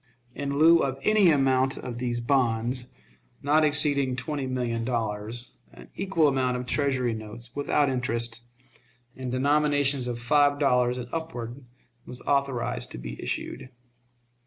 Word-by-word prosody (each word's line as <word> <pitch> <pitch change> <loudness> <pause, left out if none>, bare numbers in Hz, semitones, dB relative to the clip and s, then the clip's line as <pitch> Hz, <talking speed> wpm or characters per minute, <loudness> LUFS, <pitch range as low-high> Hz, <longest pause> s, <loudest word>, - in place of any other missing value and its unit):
In 140 +1 -3
lieu 165 +2 +6
of 135 -3 -1
any 215 -4 +5
amount 135 -3 +2
of 120 -1 -6
these 120 -1 -2
bonds, 120 -1 0 0.6
not 150 +2 +3
exceeding 145 -3 +3
twenty 140 0 -3
million 120 -3 -2
dollars, 115 0 -3 0.2
an - - -15
equal 190 -5 +1
amount 130 -2 +1
of 125 - -5
Treasury 130 -3 0
notes, 110 +2 -8
without 145 0 +1
interest, 115 -3 -1 0.7
in 130 -1 -5
denominations 145 0 +1
of 120 -1 -4
five 145 +3 +3
dollars 125 -3 +2
and 125 -1 -5
upward, 135 -6 -5 0.4
was 125 - -7
authorized 130 - 0
to - - -6
be - - -7
issued. 130 0 -4
130 Hz, 135 wpm, -26 LUFS, 120-145 Hz, 0.7 s, lieu